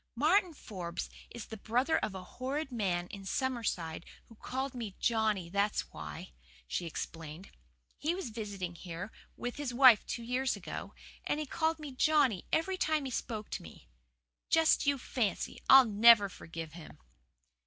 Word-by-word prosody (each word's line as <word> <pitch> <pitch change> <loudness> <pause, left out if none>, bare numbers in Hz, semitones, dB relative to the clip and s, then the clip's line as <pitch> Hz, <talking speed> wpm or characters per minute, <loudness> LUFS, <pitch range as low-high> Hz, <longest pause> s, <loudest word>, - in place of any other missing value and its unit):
"Martin 345 - +3
Forbes 180 - -6 0.2
is 235 -3 -8
the 220 - -8
brother 250 +9 +1
of 195 - -3
a 185 - -6
horrid 265 +8 -4
man 185 -7 0
in 200 -2 -8
Summerside 195 - -2 0.2
who 230 - -16
called 265 +4 -4
me 225 -6 -5
Johnny, 220 -6 +1
that's 200 +4 0
why," 75 -3 -8 0.4
she 170 - -2
explained. 165 +2 -7 0.5
"He 325 +4 0
was 370 -11 -5
visiting 200 -5 -5
here 175 +4 -7 0.3
with 245 0 -4
his 275 -4 -3
wife 255 -5 +8
two 235 - -4
years 255 +3 0
ago, - - -7 0.3
and 295 - -1
he 305 - -2
called 320 +3 0
me 300 -3 -7
Johnny 265 - +2
every 370 +4 +1
time 310 -5 +1
he 260 - -4
spoke 215 -3 -4
to - - -3
me. 80 -6 -14 0.6
Just 320 -3 +4
you 285 -1 +3
fancy! 240 -4 -2
I'll 265 -1 +10
NEVER 215 -1 +7
forgive 165 -3 -8
him." 165 -2 -11
230 Hz, 160 wpm, -32 LUFS, 185-270 Hz, 0.6 s, I'll